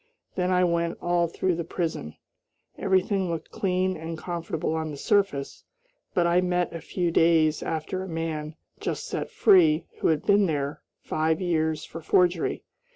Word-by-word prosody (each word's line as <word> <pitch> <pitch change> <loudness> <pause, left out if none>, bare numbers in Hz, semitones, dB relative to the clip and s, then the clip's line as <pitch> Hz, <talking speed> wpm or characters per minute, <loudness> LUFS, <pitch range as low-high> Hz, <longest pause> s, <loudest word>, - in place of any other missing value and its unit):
Then 180 0 0
I 180 0 +3
went 170 -1 0
all 175 -1 +1
through 180 +2 -1
the 170 0 -2
prison. 160 - -4 0.6
Everything 190 0 +1
looked 165 -2 -4
clean 185 -1 0
and 160 0 -6
comfortable 165 -2 -3
on 160 -1 -2
the 145 - -6
surface, 195 -6 0 0.5
but 175 - +3
I 170 +1 +3
met 180 -1 0
a 165 - -6
few 175 -2 -1
days 160 -2 +3
after 160 +4 -3
a 190 - -5
man, 160 -2 -3 0.2
just - - -3
set - - -4
free, 170 -7 +5
who - - +1
had 155 -2 +1
been 200 -1 +4
there 145 -2 -2 0.2
five 160 0 0
years 160 -4 0
for 165 - -9
forgery. 175 +1 +2
170 Hz, 160 wpm, -26 LUFS, 160-180 Hz, 0.6 s, free